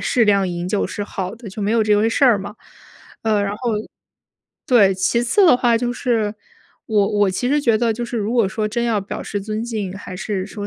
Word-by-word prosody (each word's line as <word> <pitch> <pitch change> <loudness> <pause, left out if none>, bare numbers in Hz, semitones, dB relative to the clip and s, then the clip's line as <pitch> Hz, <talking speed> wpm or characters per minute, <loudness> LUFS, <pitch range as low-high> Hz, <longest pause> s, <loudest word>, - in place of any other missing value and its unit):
适 240 -3 +2
量 200 -2 +3
饮 175 0 -4
酒 205 - 0
是 205 - -5
好 195 0 -5
的， 230 -3 -10
就 200 +3 -8
没 205 +2 0
有 230 -1 +3
这 210 -1 +3
回 220 +2 +2
事 275 +4 +2
儿 235 -5 +5
嘛。 205 +2 -7 0.7
呃， 215 -2 +1
然 200 - -2
后 240 0 -2 1.0
对， 200 -7 +5
其 195 +6 +1
次 375 - +3
的 325 - +7
话， 240 -2 +2
就 245 +1 -1
是 225 -5 -1 0.5
我 210 -3 +2
我 200 -2 +4
其 245 +7 -2
实 295 +1 +2
觉 230 -5 +3
得 230 0 +1
就 240 +2 -4
是 240 - -5
如 215 +2 -1
果 230 -6 +2
说 215 +2 -2
真 235 +2 -2
要 225 -3 +1
表 195 - -6
示 205 - -4
尊 215 +2 -4
敬， 215 -6 -4
还 185 -2 -8
是 195 -2 -3
说 205 -1 -6
215 Hz, 255 characters per minute, -20 LUFS, 200-235 Hz, 1.0 s, 的